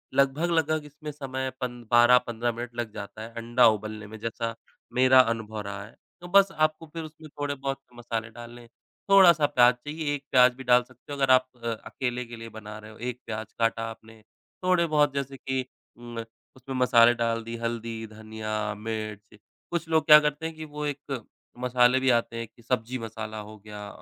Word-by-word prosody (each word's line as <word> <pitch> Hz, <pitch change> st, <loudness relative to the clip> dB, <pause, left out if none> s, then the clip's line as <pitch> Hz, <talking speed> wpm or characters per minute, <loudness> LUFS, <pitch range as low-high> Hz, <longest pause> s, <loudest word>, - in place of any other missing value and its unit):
लगभग-लगभग 155 Hz, +3 st, +2 dB
इसमें 150 Hz, +1 st, -8 dB
समय 130 Hz, -2 st, -4 dB
पन 120 Hz, -1 st, -4 dB
12-15 120 Hz, 0 st, +4 dB
मिनट 120 Hz, +1 st, -7 dB
लग 120 Hz, -3 st, -4 dB
जाता 105 Hz, +1 st, -8 dB
है 110 Hz, -, -7 dB
अंडा 120 Hz, +2 st, +4 dB
उबलने 110 Hz, 0 st, -8 dB
में 110 Hz, +1 st, -10 dB
जैसा 115 Hz, +1 st, -3 dB, 0.4 s
मेरा 130 Hz, 0 st, +7 dB
अनुभव 110 Hz, -1 st, -7 dB
रहा 100 Hz, 0 st, -6 dB
है। 110 Hz, -, -16 dB, 0.3 s
तो 175 Hz, -, -8 dB
बस 195 Hz, +1 st, +5 dB
आपको 155 Hz, -1 st, 0 dB
फिर 165 Hz, -1 st, -4 dB
उसमें 155 Hz, 0 st, -11 dB
थोड़े 145 Hz, -1 st, -3 dB
बहुत 135 Hz, 0 st, -3 dB, 0.2 s
मसाले 115 Hz, -1 st, -4 dB
डालने 120 Hz, +1 st, -11 dB
हैं, 120 Hz, -, -17 dB, 0.4 s
थोड़ा-सा 175 Hz, -6 st, +7 dB
प्याज़ 125 Hz, -4 st, +5 dB
चाहिए। 150 Hz, +3 st, -4 dB
1 140 Hz, -, -8 dB
प्याज़ 125 Hz, -1 st, +6 dB
भी 135 Hz, -, -9 dB
डाल 125 Hz, -1 st, +5 dB
सकते 125 Hz, +3 st, -17 dB
हो -, -, -5 dB
अगर 135 Hz, -1 st, +3 dB
आप 130 Hz, 0 st, +5 dB, 0.2 s
अ, 115 Hz, -, -3 dB, 0.2 s
अकेले 125 Hz, -1 st, -3 dB
के 120 Hz, 0 st, -9 dB
लिए 115 Hz, 0 st, -9 dB
बना 105 Hz, -1 st, -8 dB
रहे 110 Hz, 0 st, -12 dB
हो। 110 Hz, -, -15 dB
1 125 Hz, +1 st, -4 dB
प्याज़ 110 Hz, -1 st, -6 dB
काटा 115 Hz, 0 st, +1 dB
आपने 110 Hz, 0 st, -13 dB, 0.4 s
थोड़े 180 Hz, -2 st, +3 dB
बहुत 145 Hz, -2 st, +4 dB
जैसे 140 Hz, -1 st, -3 dB
कि 130 Hz, -1 st, -2 dB, 0.3 s
उम, 120 Hz, -1 st, -9 dB, 0.4 s
उसमें 130 Hz, +1 st, -7 dB
मसाले 120 Hz, -2 st, +6 dB
डाल 115 Hz, -1 st, -1 dB
दि, 115 Hz, +1 st, -6 dB
हल्दी, 115 Hz, -1 st, -4 dB
धनिया, 110 Hz, -1 st, -4 dB
मिर्च। 105 Hz, -1 st, -6 dB, 0.3 s
कुछ 170 Hz, -1 st, -2 dB
लोग 160 Hz, -1 st, +3 dB
क्या 150 Hz, -1 st, +10 dB
करते 150 Hz, +1 st, -2 dB
हैं 160 Hz, -, -4 dB
कि 155 Hz, 0 st, -7 dB
वो 150 Hz, 0 st, -5 dB
एक 140 Hz, -4 st, -4 dB, 0.4 s
मसाले 125 Hz, 0 st, +4 dB
भी 130 Hz, 0 st, +2 dB
आते 115 Hz, 0 st, -4 dB
हैं 115 Hz, 0 st, -4 dB
कि 115 Hz, +2 st, -23 dB
सब्ज़ी 125 Hz, +1 st, -1 dB
मसाला 110 Hz, -1 st, -6 dB
हो 110 Hz, 0 st, -11 dB
गया, 105 Hz, 0 st, -9 dB
120 Hz, 195 wpm, -27 LUFS, 115-140 Hz, 0.4 s, क्या